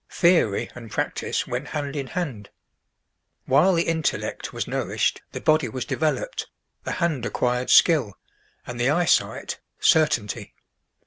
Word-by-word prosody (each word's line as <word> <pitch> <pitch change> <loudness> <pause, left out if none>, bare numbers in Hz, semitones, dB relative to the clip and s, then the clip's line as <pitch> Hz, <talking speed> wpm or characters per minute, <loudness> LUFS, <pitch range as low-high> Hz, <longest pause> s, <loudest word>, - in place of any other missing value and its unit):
Theory 170 - +3
and 115 -2 -10
practice - - -2
went 125 +4 -4
hand 145 -2 -4
in 140 -2 -3
hand. 130 - -4 1.0
While 155 +8 +4
the 165 - +2
intellect 160 -2 -2
was - - -4
nourished, - - -1
the - - -5
body 155 -5 +2
was 125 +2 -4
developed, 160 - -2 0.4
the - - -2
hand 165 -8 -1
acquired 125 +1 -1
skill, 140 - +5 0.5
and 120 -1 -7
the 120 +2 +2
eyesight, 170 +2 +1 0.2
certainty. 135 -10 +2
145 Hz, 130 wpm, -24 LUFS, 125-165 Hz, 1.0 s, skill